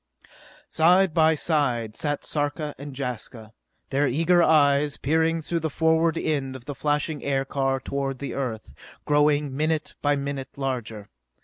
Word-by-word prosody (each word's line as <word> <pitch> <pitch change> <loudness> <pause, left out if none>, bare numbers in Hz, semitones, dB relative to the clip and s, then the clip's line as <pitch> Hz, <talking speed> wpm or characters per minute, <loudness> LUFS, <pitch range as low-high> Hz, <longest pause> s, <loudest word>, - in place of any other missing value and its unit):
Side 180 +2 +4
by 160 -1 +4
side 125 -9 0
sat 145 -2 -2
Sarka 150 0 -2
and 140 -2 -8
Jaska, 120 -4 -6 0.4
their 140 +1 +2
eager 165 +7 +3
eyes 145 -2 +3
peering 160 +3 +1
through 170 +2 -1
the 160 0 -2
forward 160 +2 +2
end 140 -5 -1
of 125 -2 -10
the 145 - -5
flashing 150 +1 -1
aircar 135 -1 0
toward 135 0 -3
the 140 - -5
Earth, 110 - -4 0.3
growing 145 -1 +2
minute 155 +1 -1
by 145 0 +2
minute 140 -1 -5
larger. 120 -6 -4
145 Hz, 140 wpm, -25 LUFS, 135-155 Hz, 0.4 s, Side